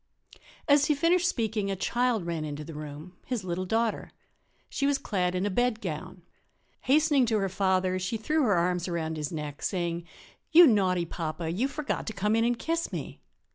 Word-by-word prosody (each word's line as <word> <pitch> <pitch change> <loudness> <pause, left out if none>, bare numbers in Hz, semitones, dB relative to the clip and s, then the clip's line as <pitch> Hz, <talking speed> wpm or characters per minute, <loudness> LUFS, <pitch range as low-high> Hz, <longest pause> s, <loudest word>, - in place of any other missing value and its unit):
As 285 -1 +5
he 300 - +2
finished 345 +4 +3
speaking, 220 - -1
a 195 - -1
child 240 0 0
ran 165 -2 -2
into 150 0 -5
the 160 - -9
room 150 +4 -8
his 245 -6 -3
little 185 +1 -3
daughter. 225 +2 0 0.6
She 275 - -1
was 285 -1 +2
clad 180 -7 -1
in 185 +2 0
a 205 - 0
bedgown. 185 -7 -2 0.6
Hastening 290 -2 +3
to 220 -1 +2
her 195 -2 0
father 185 -1 +1
she 185 +5 -2
threw 305 +9 0
her 215 -8 +3
arms 175 +1 0
about 160 -2 -2
his 150 -2 -4
neck, 150 -2 -6
saying: 170 -2 -2 0.5
"You 345 +1 +9
naughty 190 - +3
papa, 165 0 -4
you 220 +10 0
forgot 295 +1 -4
to 220 - -3
come 210 +2 +1
in 225 - +3
and 240 0 +1
kiss 330 +6 -2
me. - - -6
195 Hz, 185 wpm, -28 LUFS, 170-245 Hz, 0.6 s, You